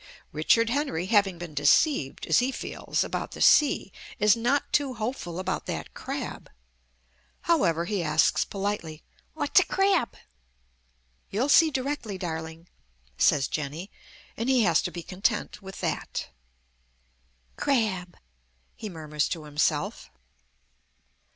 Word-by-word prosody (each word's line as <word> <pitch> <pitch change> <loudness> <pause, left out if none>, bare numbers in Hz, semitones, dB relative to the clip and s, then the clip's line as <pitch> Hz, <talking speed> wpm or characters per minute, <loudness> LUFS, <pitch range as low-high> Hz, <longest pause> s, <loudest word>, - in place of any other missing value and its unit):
Richard 225 +10 +3
Henry, 275 - -1
having 195 -3 +2
been 170 -2 -8
deceived, 145 - +2
as 160 - +4
he 255 +2 +1
feels, - - -2
about - - -4
the - - -9
sea, 290 -9 +4 0.3
is 210 +1 +5
not 245 +5 0
too 275 -3 +1
hopeful 215 -6 -4
about 185 - -3
that - - -5
crab. - - -6 0.9
However, 170 - +2
he 200 0 -1
asks 155 -1 +3
politely, 195 -6 -4 0.3
"What's - - +4
a - - +3
crab?" 390 -10 +1 1.1
"You'll 240 +8 0
see 320 +3 +7
directly, 260 -7 -3
darling," 160 -1 -6 0.5
says 140 -3 +4
Jenny; 155 +6 -5 0.4
and 230 +4 -2
he 255 -3 +4
has 190 - +4
to - - -3
be 170 - -7
content 205 +4 -2
with 195 0 -9
that. - - -3 1.3
"Crab," 215 -10 0 0.6
he 215 - -7
murmurs 155 -4 -2
to 165 -3 -4
himself. 150 0 -1
195 Hz, 125 wpm, -27 LUFS, 160-245 Hz, 1.3 s, see